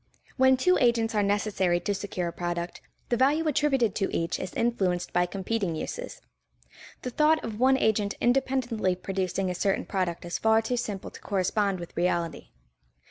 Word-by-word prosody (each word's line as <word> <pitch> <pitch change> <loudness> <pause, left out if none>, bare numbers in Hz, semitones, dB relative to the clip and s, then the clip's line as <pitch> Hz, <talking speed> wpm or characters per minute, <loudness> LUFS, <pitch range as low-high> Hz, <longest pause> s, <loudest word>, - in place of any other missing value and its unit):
When 260 0 +5
two 365 +8 +3
agents 235 -2 +2
are 210 - +2
necessary 200 -3 +1
to 205 - -1
secure 185 -3 -3
a - - -9
product, 175 0 -4 0.3
the 240 - +1
value 295 +6 +3
attributed 270 -5 +2
to 195 - 0
each 165 0 -1
is 185 - -5
influenced 190 -7 0
by 175 0 +2
competing 195 -1 -2
uses. - - -6 0.8
The 250 - -3
thought 310 +4 +3
of 220 -1 -5
one 265 +1 +5
agent 210 -4 +1
independently 245 -6 +1
producing 185 0 -2
a - - -2
certain 195 +2 0
product 180 -4 -2
is 175 - -3
far 220 0 +3
too 245 +2 -1
simple 210 -5 -4
to - - -12
correspond 195 0 0
with 170 - -9
reality. 170 -1 -1
205 Hz, 170 wpm, -27 LUFS, 180-240 Hz, 0.8 s, When